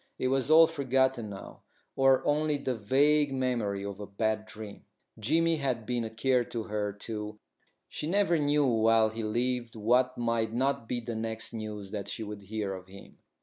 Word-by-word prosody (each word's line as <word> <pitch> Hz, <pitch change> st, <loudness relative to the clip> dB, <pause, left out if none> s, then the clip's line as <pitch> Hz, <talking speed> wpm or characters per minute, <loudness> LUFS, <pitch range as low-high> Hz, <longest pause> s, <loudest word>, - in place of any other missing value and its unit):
It 130 Hz, -, 0 dB
was 135 Hz, +1 st, +1 dB
all 160 Hz, +1 st, +9 dB
forgotten 130 Hz, -6 st, 0 dB
now, 100 Hz, -1 st, -10 dB, 0.3 s
or 135 Hz, -1 st, +4 dB
only 150 Hz, 0 st, +1 dB
the 135 Hz, -2 st, -2 dB
vague 140 Hz, +6 st, +3 dB
memory 120 Hz, -7 st, -1 dB
of 100 Hz, 0 st, -6 dB
a 105 Hz, -, -6 dB
bad 110 Hz, +1 st, -1 dB
dream. 110 Hz, -1 st, -10 dB, 0.3 s
Jimmy 165 Hz, +8 st, +2 dB
had 130 Hz, -6 st, -2 dB
been 120 Hz, 0 st, -1 dB
a 110 Hz, -, -4 dB
care 125 Hz, +3 st, +1 dB
to 115 Hz, -1 st, -5 dB
her, 105 Hz, -1 st, -2 dB
too; 105 Hz, +1 st, -6 dB, 0.5 s
she 150 Hz, -, -4 dB
never 180 Hz, -2 st, +2 dB
knew 145 Hz, 0 st, +2 dB
while 115 Hz, -2 st, +4 dB
he 110 Hz, +1 st, -5 dB
lived 120 Hz, +2 st, -1 dB
what 125 Hz, +4 st, +2 dB
might 115 Hz, -2 st, 0 dB
not 130 Hz, -2 st, 0 dB
be 120 Hz, -1 st, -1 dB
the 115 Hz, 0 st, -5 dB
next 110 Hz, 0 st, -4 dB
news 105 Hz, -3 st, -6 dB
that 100 Hz, -2 st, -4 dB
she 110 Hz, -, -4 dB
would 105 Hz, -1 st, -7 dB
hear 100 Hz, 0 st, -3 dB
of 95 Hz, -1 st, -9 dB
him. 100 Hz, +1 st, -14 dB
115 Hz, 185 wpm, -29 LUFS, 105-135 Hz, 0.5 s, all